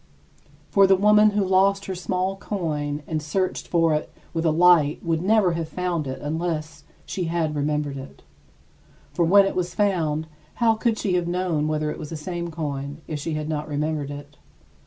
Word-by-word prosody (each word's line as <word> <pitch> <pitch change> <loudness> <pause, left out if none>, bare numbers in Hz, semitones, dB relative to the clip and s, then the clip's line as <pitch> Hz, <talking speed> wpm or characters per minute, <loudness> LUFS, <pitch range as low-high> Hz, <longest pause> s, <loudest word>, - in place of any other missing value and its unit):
For 195 -1 +6
the 190 - +6
woman 210 +2 +5
who 205 -1 0
lost 195 +1 +3
her 190 - -3
small 185 +1 -2
coin 150 -7 -3
and 155 -1 -2
searched 185 +5 -2
for 165 -2 +2
it 150 - -2 0.2
with 165 0 -1
a - - +4
light 165 -3 +4
would 165 -1 0
never 200 -1 +3
have 165 -1 -3
found 175 -4 -2
it 130 - -5
unless 160 +1 -3 0.2
she 180 - -3
had 165 -2 -1
remembered 145 -1 -1
it. 135 +1 -11 0.9
For 175 - +1
when 195 +4 +6
it 195 - -2
was 180 -1 -2
found, 165 -7 +1 0.3
how 230 -2 +3
could 225 0 0
she 195 -4 -1
have 175 -1 +1
known 175 -4 0
whether 155 0 -1
it - - -7
was 150 - -7
the 160 - -5
same 170 +2 -4
coin, 145 -2 -5
if 155 -2 -4
she 155 +2 -3
had 155 0 -3
not 150 -1 -3
remembered 150 -1 -2
it? 145 0 -9
165 Hz, 190 wpm, -24 LUFS, 150-185 Hz, 0.9 s, For